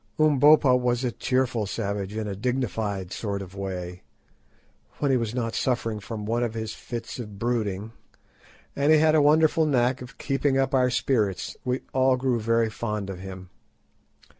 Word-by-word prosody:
Umbopa 150 -2 +6
was 125 0 0
a 125 - 0
cheerful 125 -4 0
savage, 100 -1 -3
in 110 -1 -2
a 100 - -4
dignified 105 -5 -2
sort 100 -3 -3
of 95 0 -12
way, 90 -2 -5 1.0
when 145 -2 +1
he 130 - +4
was 115 -1 -3
not 115 -2 -2
suffering 115 -4 -1
from 105 0 -6
one 115 +3 0
of 115 -2 -2
his 110 -1 -4
fits 115 +1 -7
of 105 -4 -7
brooding, 110 -2 -2 0.8
and 140 +2 +2
he 155 - +7
had 155 0 +4
a 155 - +5
wonderful 155 +2 +4
knack 125 -2 +1
of 125 0 -10
keeping 135 -1 0
up 135 0 +1
our 130 -1 +4
spirits. 115 -6 0
We 125 0 -1
all 130 0 +3
grew 125 -2 0
very 115 0 +1
fond 105 -4 -3
of 90 - -8
him. 95 -1 -9
120 Hz, 170 wpm, -25 LUFS, 105-130 Hz, 1.0 s, he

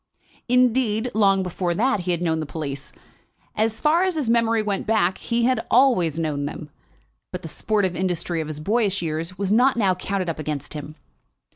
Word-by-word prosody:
Indeed, 250 -2 +2
long 195 -3 +3
before 180 -1 -2
that 250 +3 +1
he 180 0 -5
had 175 0 0
known 160 -2 0
the 155 - -4
police. 140 -2 -6 0.6
As 220 +1 0
far 315 +3 +3
as 375 -2 +1
his 275 -7 0
memory 230 -1 +2
went 200 -2 -2
back 200 -4 +1
he 235 0 -1
had 255 +1 +2
always 230 - +3
known 150 -3 -1
them. 150 +1 -7 0.6
But 180 -1 -6
the - - -5
sportive 195 +2 -1
industry 175 -2 -1
of 155 - -5
his 155 -1 -6
boyish 200 +1 0
years 165 +3 -2
was 195 -1 -2
not 250 +4 +4
now 195 -5 +3
counted 185 0 -3
up 165 -2 -3
against 150 -2 -4
him. 150 0 -7
190 Hz, 185 wpm, -23 LUFS, 165-230 Hz, 0.6 s, not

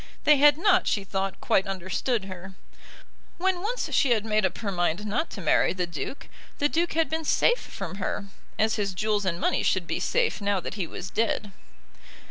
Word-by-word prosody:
They 300 -1 +6
had 290 +1 +6
not, 370 +1 +3
she 205 - +1
thought, 195 0 -3
quite 195 - +2
understood 195 +4 -2
her. 190 0 -9 0.8
When 365 0 0
once 470 +5 -2
she 275 - +3
had 220 -3 +2
made 215 -3 +2
up - - -8
her 205 -3 -3
mind 175 +2 0
not 235 +11 -1
to - - -7
marry - - +3
the 185 -1 -1
Duke, 170 - -6 0.3
the 290 - +2
Duke 335 +3 0
had 325 0 +2
been 320 +3 -2
safe 480 +10 +3
from 190 - -7
her; 200 +1 -3 0.3
as 220 +1 +2
his 200 -3 -2
jewels 210 0 0
and 170 -2 -1
money - - +1
should 185 -2 +1
be - - -2
safe 480 - 0
now 200 -1 +1
that - - -6
he 190 -4 -3
was 190 - -7
dead. 215 -2 0
210 Hz, 200 wpm, -26 LUFS, 190-295 Hz, 0.8 s, They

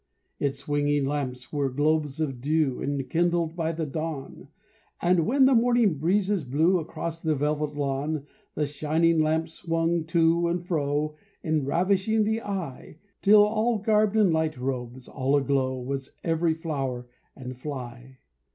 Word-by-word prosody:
Its 140 -1 -1
swinging 145 0 0
lamps 130 -3 -4
were 140 -2 0
globes 150 +2 0
of 135 -6 -2
dew, 150 -2 +1
Enkindled 165 +4 0
by 165 -2 -1
the 165 -1 -3
dawn, 155 -2 -5 0.5
And 175 -1 +2
when 265 +3 +4
the 265 - +5
morning 235 - +3
breezes 190 +3 +1
blew 160 +8 +2
Across 165 0 -5
the 160 -2 +1
velvet 150 +1 -1
lawn, 145 +1 -2 0.3
The 150 - 0
shining 155 +3 +1
lamps 160 +1 +1
swung 165 -1 -1
to 170 0 +2
and 175 +1 -2
fro. 150 -2 -1 0.3
Enravishing 185 +8 +1
the 220 +2 0
eye, 175 - -6 0.2
Till 215 +3 +4
garbed 215 0 +2
in 210 -5 +4
light 160 -2 0
robes, 125 -1 -4
all 135 +1 0
aglow, 135 -2 +1
Was 135 +1 -5
every 165 -1 +1
flower 135 -7 -3 0.3
and 130 -1 -7
fly. 130 -1 -8
155 Hz, 140 wpm, -26 LUFS, 140-170 Hz, 0.5 s, the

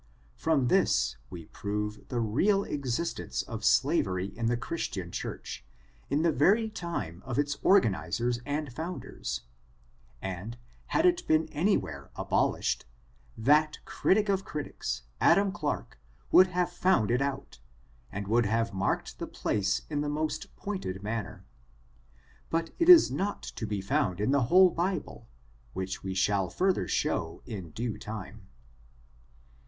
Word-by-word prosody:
From 150 -6 +1
this, - - +2
we 85 -3 -8
prove 105 +3 -4
the 125 - -2
real 180 - +2
existence 140 +2 -2
of - - -7
slavery 95 +1 +2
in 115 -1 -1
the 120 +1 +1
Christian 115 - -4
church, 65 - -6 0.5
in 145 +3 +1
the 170 - +4
very 210 - +3
time 105 - -5
of 125 -2 -4
its 145 0 0
organizers 120 - +2
and 145 -1 -3
founders, 155 - -5 0.8
and, 95 - -5 0.3
had 320 - +2
it 360 0 +3
been 155 0 +3
any 185 +7 +2
where 70 -3 -7
abolished, - - 0 0.5
that 150 +6 +3
critic 210 +2 +2
of 195 -1 +1
critics, 150 - -4 0.2
Adam 200 0 +4
Clarke, 150 - -4 0.3
would 185 - +8
have 180 -1 0
fouad 175 - +2
it 125 +2 +2
out, 140 - -3 0.5
and 100 0 -5
would 115 +1 +3
have 115 +1 0
marked 95 - -1
the - - -4
place 100 -2 -1
in 145 -2 -2
the 145 - -1
most 155 +1 -3
pointed 100 - -5
manner; 110 +1 -4 1.0
but 165 0 -1
it 340 +1 +3
is 350 -2 +9
not 200 +2 -2
to 110 - -5
be 105 -2 -2
found 100 - 0
in 105 +5 +1
the 140 -3 +3
whole 180 +7 +6
Bible, 175 -9 -3 0.5
which 95 0 -4
we 95 -1 -3
shall 95 0 +1
further 185 - +1
show 80 0 -1
in 100 -9 -6
due 115 +7 -4
time. 105 -1 -8
125 Hz, 140 wpm, -29 LUFS, 100-170 Hz, 1.0 s, is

